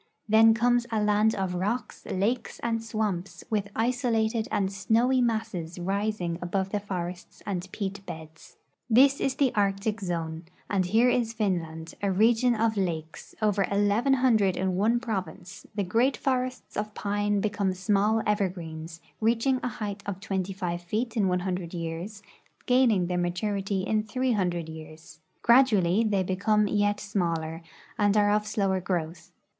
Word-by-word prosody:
Then 220 +1 +6
comes 240 +1 +2
a 220 - +1
land 210 +1 +3
of 190 -2 -2
rocks, 205 +8 -3
lakes, 225 +6 -1
and 230 -1 0
swam])s,with 210 -2 -3
isolated 230 -2 0
and 195 -1 0
snowy 230 +6 +2
masses 220 -8 -2
rising 190 -1 -2
above 190 +2 -1
the 210 - 0
forests 180 -3 -6
and 190 -2 -4
peat 200 -1 -4
l)eds. 160 0 -10 0.3
This 270 +4 +5
is 270 -1 0
the 270 -3 +2
Arctic 205 +1 0
zone, 165 -2 -3 0.2
and 190 -3 0
here 230 +6 +4
is 230 -2 0
Finland, 165 -7 -2
a 200 -1 +1
region 230 +5 +3
of 220 -1 +1
lakes, 165 -4 -4
over 205 -2 +2
eleven 205 +6 +2
hundred 220 -8 +3
in 185 -1 0
one 225 +5 +2
province; 190 -6 -5
the 205 - 0
great 230 +9 +2
forests 255 -2 -2
of 210 0 -3
pine 205 0 0
become 205 -2 0
small 205 +3 +1
evergreens, 170 -5 -3 0.2
reaching 235 +4 +2
a - - -2
height 210 -4 -5
of 195 -2 -3
25 185 -3 -3
feet 220 +7 -3
in 205 -4 +2
100 180 -1 -2
years, 170 +5 -5 0.4
gaining 245 -7 +4
their 180 0 -1
maturity 195 +2 -1
in 215 +2 +1
300 205 -8 -1
years. 160 0 -11 0.2
Gradually 225 -6 +5
they 205 -4 +1
become 210 +3 +1
yet 205 0 +1
smaller 170 -5 -2 0.4
and 205 0 +3
are 205 0 +4
of 210 0 +1
slower 195 -3 0
growth. 170 -2 -3
205 Hz, 145 wpm, -27 LUFS, 180-225 Hz, 0.4 s, Then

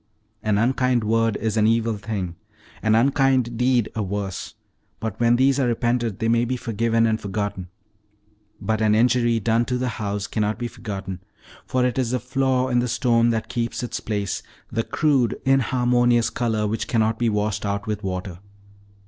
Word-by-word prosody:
An 105 -2 +1
unkind 125 +1 +2
word 115 0 +1
is 110 -1 -2
an 110 0 +4
evil 115 0 +2
thing, 100 -5 -4 0.5
an 110 0 +3
unkind 130 -1 +2
deed 125 -1 +2
a 110 - -2
worse, 100 -2 -4 0.4
but 110 -1 -4
when 120 0 +4
these 135 +2 +3
are 130 - +2
repented 120 -2 0
they 115 - -1
may 115 +1 +3
be 125 +1 -1
forgiven 115 0 +1
and 110 -1 0
forgotten. 100 -2 -3 0.9
But 110 0 -1
an 105 -1 +3
injury 120 0 +3
done 115 +2 +2
to 125 0 -1
the 125 0 -1
house 100 -1 -2
cannot 105 0 -1
be 120 - -3
forgotten, 95 -5 -6 0.5
for 130 -1 +1
it 125 +1 0
is 125 -3 0
the 125 +1 0
flaw 130 0 0
in 120 -1 +2
the 125 - 0
stone 120 -1 +2
that 115 -1 -1
keeps 120 +1 -3
its 120 - -3
place, 100 -3 -3 0.3
the 115 - 0
crude, 135 -2 +1
inharmonious 120 -2 +3
color 110 -3 0
which 110 +2 -2
cannot 110 -1 +1
be 120 -1 +2
washed 105 0 -1
out 100 0 -2
with 105 -1 -3
water. 90 -1 -4
115 Hz, 175 wpm, -23 LUFS, 105-125 Hz, 0.9 s, an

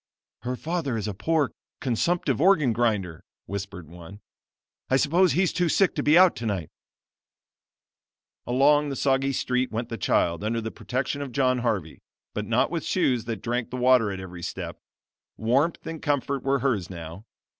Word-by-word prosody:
"Her 125 +2 -3
father 155 -4 -2
is 110 -1 -3
a 105 - -3
poor, 150 - 0 0.3
consumptive 135 +2 0
organ 155 -9 +4
grinder," 105 -8 -1 0.2
whispered 100 -4 -6
one. 85 +4 -12 0.7
"I 130 - +4
suppose 170 +6 +3
he's 180 0 +2
too 175 -2 +1
sick 195 +3 +3
to - - -1
be 150 +3 +5
out 185 -1 +6
tonight." 100 -8 -3 1.8
Along 145 +4 +4
the 135 - -3
soggy 135 0 +1
street 125 -1 -1
went 115 +2 -3
the 115 - -5
child, 85 +3 +1
under 115 +2 0
the 115 0 -4
protection 130 +3 -3
of 140 -3 -5
John 130 0 +2
Harvey, 105 -10 -2 0.3
but - - -4
not - - +2
with - - -2
shoes 125 -3 +1
that 115 -4 -5
drank 120 0 -2
the 125 - -5
water 125 -4 +4
at 95 - -5
every 90 -2 -8
step. - - -6 0.6
Warmth 135 +9 +1
and 160 -1 -6
comfort 140 -1 -1
were 135 +1 +1
hers 110 -10 0
now. 85 +4 -9
125 Hz, 165 wpm, -26 LUFS, 105-140 Hz, 1.8 s, out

